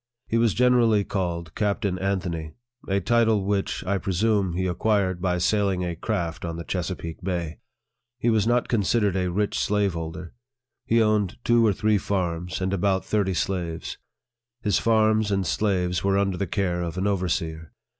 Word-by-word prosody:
He 115 - 0
was 115 -4 +2
generally 120 -4 +4
called 85 -4 -3
Captain 100 -3 -1
Anthony 90 -5 -2 0.3
a 100 0 +1
title 110 -1 +2
which, 100 -1 -1
I 100 +1 0
presume, 100 0 +1
he 95 +2 -1
acquired 95 0 0
by 90 -1 +1
sailing 95 0 +1
a 85 -1 -3
craft 85 0 -3
on 85 -1 -3
the 85 - -5
Chesapeake 85 -2 -4
Bay. 85 -4 -3 0.6
He 120 -1 +1
was 110 -1 +2
not 120 +1 +2
considered 105 -2 +1
a 90 -1 0
rich 100 +3 -1
slave 100 -2 +1
holder. 80 +1 -6 0.5
He 115 0 +4
owned 105 -3 +1
two 120 -1 +4
or 110 - +4
three 105 +1 +1
farms, 90 -2 -2
and 95 +1 -1
about 95 0 +1
thirty 100 -3 0
slaves. 85 -3 -3 0.6
His 105 -4 +2
farms 110 -1 +3
and 95 -2 0
slaves 90 -4 0
were 100 0 +2
under 100 -1 +1
the 100 - -2
care 90 -1 -1
of 85 0 -4
an 95 - -1
overseer. 85 -5 -2
95 Hz, 165 wpm, -25 LUFS, 90-105 Hz, 0.6 s, generally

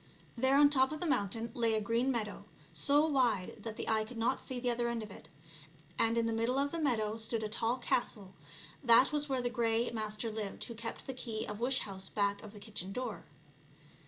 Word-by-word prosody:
There 260 +3 +3
on 290 - +8
the 285 - +5
top 265 -1 +4
of 310 - -4
the 355 - -3
mountain 225 - 0
lay 230 -2 +2
a - - +2
green 230 +5 +1
meadow, 215 -4 -3 0.3
so 290 +2 +4
wide 250 -11 +1
that 225 -1 -6
the - - -4
eye 220 -1 +2
could 230 +2 -9
not 235 +4 +1
see 260 - -5
to 245 - -4
the 245 - +3
other 240 0 0
end 235 -2 -2
of 210 - -9
it. 155 -4 -12 0.7
And 230 +1 +3
in 230 - +2
the 230 - 0
middle 230 +3 +1
of 280 +1 +1
the 335 - -3
meadow 225 -7 0
stood 225 0 0
a - - -1
tall 230 +3 0
castle; 210 -5 -1 0.5
that 235 +1 +6
was 295 -1 -1
where 260 -2 0
the 245 - +1
Grey 235 -1 +1
Master 220 0 -3
lived 210 -2 -4
who 235 - -5
kept 230 0 -6
the 265 - -4
key 230 -3 -4
of 210 0 -6
wish 255 +2 +1
house 190 -2 -7
back 200 -1 0
of 215 -1 -10
the 210 - -10
kitchen 200 -3 -5
door. 245 0 -4
230 Hz, 235 wpm, -33 LUFS, 215-255 Hz, 0.7 s, on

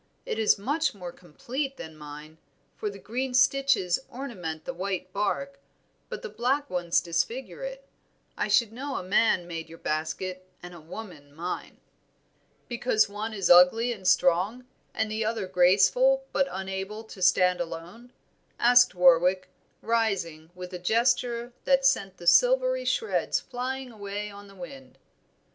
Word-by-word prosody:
It - - -3
is 220 -1 +4
much 290 +7 -1
more 180 -3 -7
complete 260 - -5
than 160 -1 -9
mine, 150 +1 -11 0.4
for 210 - -3
the 200 - -9
green 250 +6 -3
stitches 270 -8 +3
ornament 180 - -6
the - - -4
white 185 0 -4
bark, 275 +7 -2 0.5
but - - -6
the - - -4
black 275 - 0
ones 175 -2 +1
disfigure 200 - -3
it. - - -7 0.5
I - - -1
should 230 -3 +3
know 275 +3 -5
a - - -3
man 185 -1 +2
made 165 -2 -6
your 165 - -11
basket 185 +5 -4
and 175 0 -9
a 170 - -12
woman 155 -5 -10
mine." 175 +3 -5 0.9
"Because 235 -2 +1
one 210 +2 -5
is 195 -5 0
ugly 200 +8 +6
and 190 -5 -6
strong, 190 +11 +2 0.3
the 220 0 -1
other 220 -2 -2
graceful 195 - +4
but 275 -1 +1
unable 190 +3 -5
to 220 -3 -12
stand 180 0 +4
alone?" 175 +9 -8 0.5
asked 245 -3 +5
Warwick, 180 +1 +4 0.3
rising, 195 -9 -1
with 180 0 -8
a 180 - -5
gesture 235 +4 +1
that 270 0 +3
sent 200 -8 +2
the 175 - -11
silvery - - +4
shreds 450 - 0
flying 260 +1 -5
away 205 -1 -6
on 200 0 -12
the 195 - -16
wind. 265 +3 -11
205 Hz, 150 wpm, -27 LUFS, 180-250 Hz, 0.9 s, ugly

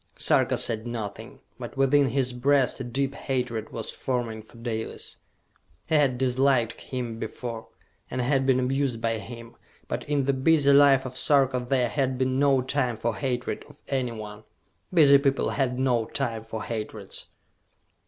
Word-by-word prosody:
Sarka - - +2
said 115 0 +1
nothing, 110 -4 -6 0.2
but - - -8
within 135 +1 +4
his 130 0 0
breast 135 +1 +2
a - - -3
deep 135 +3 -2
hatred 125 -6 -3
was 115 -2 -4
forming 120 -4 -3
for 110 +2 -18
Dalis. 115 -1 -4 0.7
He - - -4
had 140 -5 +3
disliked 130 -2 +1
him 120 -3 -5
before, 115 -2 -6 0.4
and 130 - -4
had 135 +1 +1
been 130 -1 +4
amused 130 -1 0
by 115 -1 -1
him; 115 +1 -10 0.3
but - - -3
in 145 -2 +1
the 140 - +2
busy 140 +1 +4
life 140 -2 +6
of 130 0 -6
Sarka 130 -1 +3
there 130 -3 +2
had 130 -1 -1
been 130 0 0
no 140 -2 +3
time 130 -3 -1
for 115 0 -2
hatred 125 -3 -3
of 145 - -17
anyone. 110 -5 -4 0.5
Busy 145 -6 +7
people 140 -1 +1
had 130 -3 -1
no 125 -3 +1
time 115 -3 -3
for 110 -1 -5
hatreds. 105 -3 -6
130 Hz, 160 wpm, -26 LUFS, 115-135 Hz, 0.7 s, Busy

